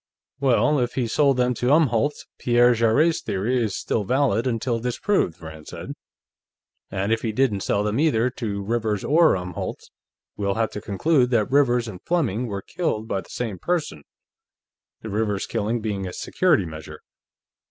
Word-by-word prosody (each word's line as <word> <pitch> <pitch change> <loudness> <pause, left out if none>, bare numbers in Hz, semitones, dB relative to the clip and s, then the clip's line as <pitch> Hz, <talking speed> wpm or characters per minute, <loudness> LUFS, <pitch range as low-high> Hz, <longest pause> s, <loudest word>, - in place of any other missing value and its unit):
"Well, 140 +2 +3
if 120 -1 -1
he 130 - 0
sold 140 +3 +2
them 125 0 +2
to 125 +1 -2
Umholtz, 145 -2 +2
Pierre 120 0 +4
Jarrett's 120 +9 +2
theory 120 +6 0
is 105 -4 -2
still 110 - -1
valid 125 0 +1
until 120 0 -1
disproved," 125 - 0
Rand 80 -2 -10
said. - - -7 1.0
"And 100 +3 -1
if 115 - -1
he 115 - -1
didn't 110 -3 +1
sell 100 +1 0
them 105 +4 -1
either 125 -6 +2
to 100 -5 -4
Rivers 110 -1 -1
or 160 -2 +4
Umholtz, 90 -1 -6 0.4
we'll 100 -1 -1
have 115 -1 0
to 105 - -6
conclude 125 +6 +1
that 115 -3 +1
Rivers 125 -4 +3
and 95 -5 -8
Fleming 125 - 0
were 100 -3 -5
killed 135 -11 -2
by 95 - -1
the - - -18
same 110 -7 -4
person, 170 - -2 1.0
the 110 - -7
Rivers 105 -1 -1
killing 115 +1 -2
being 100 -3 -3
a 90 - -7
security 155 - +1
measure. 80 -1 -9
115 Hz, 165 wpm, -23 LUFS, 100-130 Hz, 1.0 s, Pierre